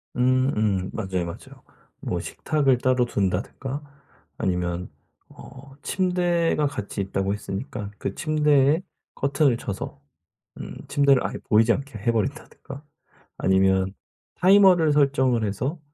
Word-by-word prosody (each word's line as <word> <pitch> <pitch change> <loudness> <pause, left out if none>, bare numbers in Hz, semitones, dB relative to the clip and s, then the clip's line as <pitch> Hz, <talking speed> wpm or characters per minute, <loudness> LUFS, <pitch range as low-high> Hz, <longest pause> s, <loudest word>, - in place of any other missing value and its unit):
음음 125 -7 +1
맞아요, 95 -5 -2
맞아요. 85 - -10 0.4
뭐 - - -2
식탁을 140 -5 0
따로 125 0 +2
둔다든가 120 +8 -2 0.6
아니면 90 -1 -2 0.4
어 135 +1 -13
침대가 175 -4 +1
같이 105 -7 -4
있다고 95 0 -1
했으니까 105 +1 -5
그 - - -4
침대에 150 0 +3 0.3
커튼을 140 -2 +2
쳐서 120 +7 -6 0.6
음 - - -7
침대를 140 -2 +3
아예 - - -5
보이지 110 +1 +5
않게 135 -3 -5
해 105 +3 0
버린다든가 135 +3 -4 0.6
아니면 95 0 +2 0.4
타이머를 185 -4 +5
설정을 130 -5 +2
해서 130 - -2
130 Hz, 270 characters per minute, -24 LUFS, 100-145 Hz, 0.6 s, 보이지